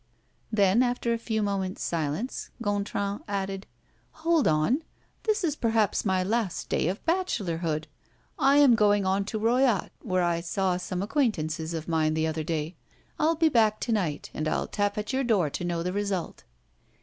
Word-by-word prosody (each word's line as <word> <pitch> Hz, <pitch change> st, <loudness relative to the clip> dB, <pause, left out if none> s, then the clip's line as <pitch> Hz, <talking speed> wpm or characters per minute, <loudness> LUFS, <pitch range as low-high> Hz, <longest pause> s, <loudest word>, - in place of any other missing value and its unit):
Then, 205 Hz, +1 st, +4 dB
after 245 Hz, -1 st, +1 dB
a 230 Hz, -, -2 dB
few 220 Hz, -2 st, -1 dB
moments' 195 Hz, -2 st, -2 dB
silence, 165 Hz, -, -2 dB
Gontran 205 Hz, -1 st, -2 dB
added: 195 Hz, -1 st, -3 dB, 0.6 s
"Hold 330 Hz, -3 st, +4 dB
on! 155 Hz, -, +2 dB, 0.4 s
This 430 Hz, -2 st, +1 dB
is 310 Hz, -4 st, +1 dB
perhaps 225 Hz, -6 st, +1 dB
my 190 Hz, -2 st, +2 dB
last 210 Hz, -2 st, -1 dB
day -, -, +1 dB
of 190 Hz, +4 st, -3 dB
bachelorhood. 175 Hz, -, -1 dB, 0.5 s
I 275 Hz, +1 st, +5 dB
am 285 Hz, -4 st, +7 dB
going 205 Hz, -3 st, +3 dB
on 195 Hz, +1 st, +1 dB
to 220 Hz, +2 st, -3 dB
Royat, 235 Hz, -1 st, +2 dB
where 185 Hz, -4 st, 0 dB
I 170 Hz, -1 st, +1 dB
saw 185 Hz, +1 st, 0 dB
some 180 Hz, +1 st, -3 dB
acquaintances 170 Hz, -, -1 dB
of 160 Hz, -1 st, -5 dB
mine 155 Hz, -2 st, +1 dB
the 160 Hz, 0 st, +1 dB
other 160 Hz, 0 st, -2 dB
day. 160 Hz, +1 st, -3 dB, 0.4 s
I'll 320 Hz, +1 st, +3 dB
be 325 Hz, 0 st, +3 dB
back 220 Hz, -5 st, +3 dB
to 235 Hz, -, -1 dB
night, 175 Hz, -9 st, -1 dB
and 155 Hz, -, -2 dB
I'll -, -, 0 dB
tap 205 Hz, 0 st, -1 dB
at 210 Hz, +4 st, -3 dB
your 265 Hz, +1 st, +1 dB
door 200 Hz, -, +2 dB
to -, -, -4 dB
know 170 Hz, -1 st, -1 dB
the 180 Hz, +1 st, -2 dB
result." 200 Hz, -3 st, -3 dB
200 Hz, 175 wpm, -27 LUFS, 170-230 Hz, 0.6 s, am